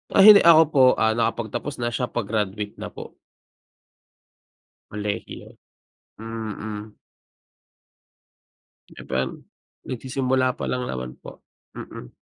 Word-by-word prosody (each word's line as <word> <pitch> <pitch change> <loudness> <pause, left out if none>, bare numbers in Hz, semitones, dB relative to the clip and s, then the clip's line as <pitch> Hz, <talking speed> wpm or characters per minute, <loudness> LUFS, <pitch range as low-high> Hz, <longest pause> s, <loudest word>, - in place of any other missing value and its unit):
Ah 195 - +7
hindi, 210 -1 +10
ako 165 -1 +7
po 140 -3 +3
ah 110 - +2
nakapagtapos 115 +4 -2
na, 120 - -1
siya 125 +1 -2
pa-graduate 105 -2 -3
na - - -5
po. - - -11 1.7
Kolehiyo, 105 0 -5 0.7
mm. 110 -1 -6 2.0
Di - - -12
pan 65 +1 -2 0.5
nagsisimula 130 0 -1
pa - - -5
lang 125 -1 -2
naman 65 0 -6
po, - - -13 0.3
mm. 60 - -9
115 Hz, 105 wpm, -23 LUFS, 105-130 Hz, 2.0 s, hindi